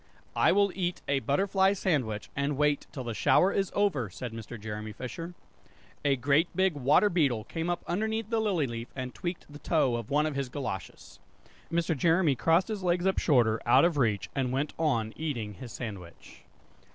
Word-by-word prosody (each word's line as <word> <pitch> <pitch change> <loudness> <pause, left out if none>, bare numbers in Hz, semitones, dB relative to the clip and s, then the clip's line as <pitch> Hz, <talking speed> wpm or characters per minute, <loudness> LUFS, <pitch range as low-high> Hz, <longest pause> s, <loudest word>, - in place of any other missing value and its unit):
"I - - +4
will 200 -1 +3
eat 180 -1 -3
a 140 -1 +2
butterfly 190 +7 +2
sandwich, 140 - -1
and 140 0 -1
wait 150 0 +1
till 130 - -6
the 120 -2 -4
shower 145 - +3
is 195 -2 0
over," 180 - +1
said 120 +5 -7
Mr. 115 +1 -8
Jeremy 105 0 -6
Fisher. 165 - -7 0.7
A 140 -2 +3
great 140 +6 +2
big 190 -1 +3
water 145 +8 +4
beetle 140 - +1
came 165 +9 -4
up 175 - -2
underneath 220 +4 -2
the 225 - +2
lily 195 -9 +1
leaf 115 -1 -5
and 130 -2 -5
tweaked 175 0 -5
the 145 0 -12
toe 145 -8 +1
of 115 -2 -5
one 150 +2 +2
of 155 - -1
his 135 -2 -3
goloshes. 125 -9 -6 0.5
Mr. 165 0 +1
Jeremy 165 +1 +3
crossed 165 - +2
his 215 -3 -3
legs 175 0 +1
up 190 - +2
shorter, 120 -7 +3
out 120 - +6
of 170 -2 +1
reach, 110 -6 +1
and 130 -2 -1
went 140 +3 -1
on 115 -9 0
eating 120 -10 -3
his 120 +5 -10
sandwich. 100 -8 -9
145 Hz, 190 wpm, -29 LUFS, 120-175 Hz, 0.7 s, out